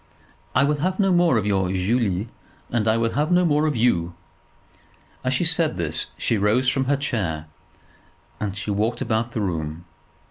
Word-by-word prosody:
"I 130 Hz, -, +5 dB
will 145 Hz, +1 st, +1 dB
have 185 Hz, +6 st, -1 dB
no 195 Hz, -2 st, +3 dB
more 175 Hz, -7 st, +4 dB
of 105 Hz, -, 0 dB
your 95 Hz, -3 st, +1 dB
Julie; 100 Hz, +1 st, 0 dB, 0.4 s
and 115 Hz, -2 st, 0 dB
I 110 Hz, +1 st, +3 dB
will 115 Hz, 0 st, 0 dB
have 150 Hz, +4 st, 0 dB
no 180 Hz, 0 st, +4 dB
more 150 Hz, -1 st, +2 dB
of 150 Hz, -, -1 dB
you." 90 Hz, -8 st, +1 dB, 1.1 s
As -, -, 0 dB
she -, -, 0 dB
said -, -, +3 dB
this -, -, -2 dB
she 115 Hz, -, 0 dB
rose 110 Hz, +6 st, +2 dB
from 130 Hz, +1 st, +1 dB
her 140 Hz, +2 st, +1 dB
chair, 95 Hz, -, -2 dB, 0.9 s
and 100 Hz, -1 st, -3 dB
walked 105 Hz, +4 st, 0 dB
about 115 Hz, +1 st, -1 dB
the 110 Hz, -, -2 dB
room. 80 Hz, -3 st, -3 dB
115 Hz, 175 wpm, -23 LUFS, 100-140 Hz, 1.1 s, I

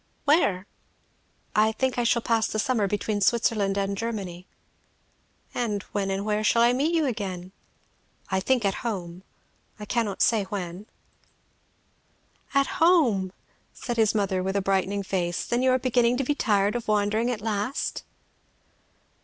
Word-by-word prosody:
"Where?" 205 Hz, -, +3 dB, 0.9 s
"I 215 Hz, +1 st, +4 dB
think 260 Hz, +2 st, -1 dB
I -, -, +2 dB
shall 235 Hz, 0 st, +2 dB
pass 225 Hz, -1 st, +2 dB
the -, -, -4 dB
summer 215 Hz, -1 st, +1 dB
between 205 Hz, +1 st, -2 dB
Switzerland 205 Hz, -2 st, +2 dB
and 200 Hz, 0 st, -1 dB
Germany." 195 Hz, -5 st, -5 dB, 1.1 s
"And 210 Hz, -5 st, -2 dB
when 200 Hz, -1 st, -1 dB
and 195 Hz, +1 st, -2 dB
where 215 Hz, 0 st, 0 dB
shall 230 Hz, +2 st, +4 dB
I 240 Hz, +1 st, +4 dB
meet 300 Hz, +7 st, +1 dB
you 320 Hz, -2 st, +2 dB
again?" 190 Hz, -7 st, -4 dB, 0.8 s
"I 190 Hz, -, +2 dB
think 245 Hz, +3 st, +1 dB
at 195 Hz, -, +2 dB
home; 180 Hz, -7 st, -4 dB, 0.6 s
I 210 Hz, -, -6 dB
cannot 210 Hz, -3 st, 0 dB
say 220 Hz, -4 st, +2 dB
when." 190 Hz, 0 st, -6 dB, 1.7 s
"At 275 Hz, 0 st, +1 dB
home!" 250 Hz, -, +4 dB, 0.4 s
said 240 Hz, -1 st, -4 dB
his 220 Hz, -1 st, +3 dB
mother 195 Hz, -3 st, 0 dB
with 190 Hz, +1 st, -2 dB
a -, -, +3 dB
brightening 195 Hz, +1 st, 0 dB
face. 175 Hz, -3 st, -2 dB
"Then 240 Hz, +1 st, 0 dB
you 260 Hz, -, +3 dB
are 255 Hz, -, +4 dB
beginning 245 Hz, -1 st, +2 dB
to 275 Hz, -, 0 dB
be 290 Hz, -, +1 dB
tired 205 Hz, -7 st, +1 dB
of 240 Hz, -1 st, -4 dB
wandering 215 Hz, +2 st, +1 dB
at 240 Hz, -4 st, -2 dB
last?" 215 Hz, +5 st, -2 dB
210 Hz, 155 wpm, -26 LUFS, 195-240 Hz, 1.7 s, I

